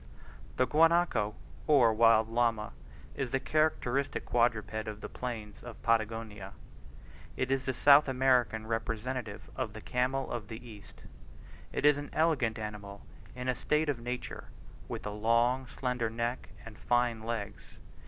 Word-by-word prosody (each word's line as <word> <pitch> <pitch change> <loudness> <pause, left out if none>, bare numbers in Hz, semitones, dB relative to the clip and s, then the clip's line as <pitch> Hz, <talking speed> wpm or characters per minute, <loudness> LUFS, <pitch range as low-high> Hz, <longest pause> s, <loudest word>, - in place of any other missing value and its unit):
The 130 - +4
guanaco, 165 -9 +3 0.3
or 130 -7 +5
wild 110 0 +5
llama, 115 -2 0 0.4
is 135 -2 -3
the 135 - 0
characteristic 140 -2 0
quadruped 110 -2 0
of 105 -1 -5
the - - -6
plains 110 -5 -6
of 120 -3 -10
Patagonia; 110 -3 -1 0.8
it 130 +1 -1
is 135 -1 0
the 130 - 0
South 145 +3 +6
American 125 -4 +2
representative 115 0 -3
of 125 -5 -3
the 110 - -8
camel 130 +3 -1
of 115 -4 -4
the 115 +3 -9
East. 105 -3 -13 0.7
It - - -2
is 150 -1 +6
an 145 0 -6
elegant 155 -9 +1
animal 105 -2 -7 0.3
in 125 0 -5
a 130 - +2
state 150 +4 0
of 135 -5 -1
nature, 125 +1 -5 0.4
with - - -6
a 105 - -3
long 115 +4 +2
slender 125 -3 -2
neck 115 +2 -3 0.2
and 115 -1 -11
fine 120 -2 +1
legs. 110 -2 -6
120 Hz, 145 wpm, -31 LUFS, 110-130 Hz, 0.8 s, South